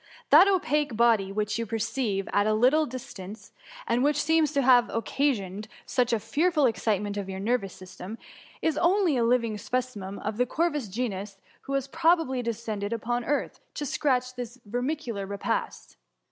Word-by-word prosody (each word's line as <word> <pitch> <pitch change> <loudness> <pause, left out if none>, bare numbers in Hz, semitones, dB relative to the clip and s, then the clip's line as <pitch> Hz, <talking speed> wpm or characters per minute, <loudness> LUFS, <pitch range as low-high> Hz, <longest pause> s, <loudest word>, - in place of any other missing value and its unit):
That 330 +7 +9
opaque 300 - +1
body 225 -5 +3
which 210 +2 -1
you 230 - -2
perceive 215 -2 -2
at 205 +1 +3
a 215 - +2
little 275 +7 +4
diB» 240 -7 -8
tmce) 220 - -15 0.3
and 245 - +1
which 295 +1 +2
seems 315 0 +2
to 280 - +2
have 245 -1 +5
occasioned 220 -5 -1 0.2
such 250 -2 +1
a 230 - +2
fearful 295 - +1
excitement 210 -3 0
of 195 -1 -4
your 190 0 -5
nervous 205 -2 -1
system, 185 +3 -9 0.5
is 320 - +1
only 355 -3 +3
a 240 - +2
living 230 -3 +1
specimen 230 -7 -3
of 215 0 -4
the 250 +1 +2
corvus 300 -4 0
genus, 200 -2 -4 0.3
who 275 - -3
has 275 -1 0
probably 325 -4 +2
descended 220 -2 -3
upon 240 +2 -2
earth 290 - -1 0.2
to 295 - -3
search 255 -3 0
{or - - -24
his 245 +1 -8
vermicular 245 -3 -3
repast. 200 - -3
240 Hz, 170 wpm, -27 LUFS, 210-280 Hz, 0.5 s, That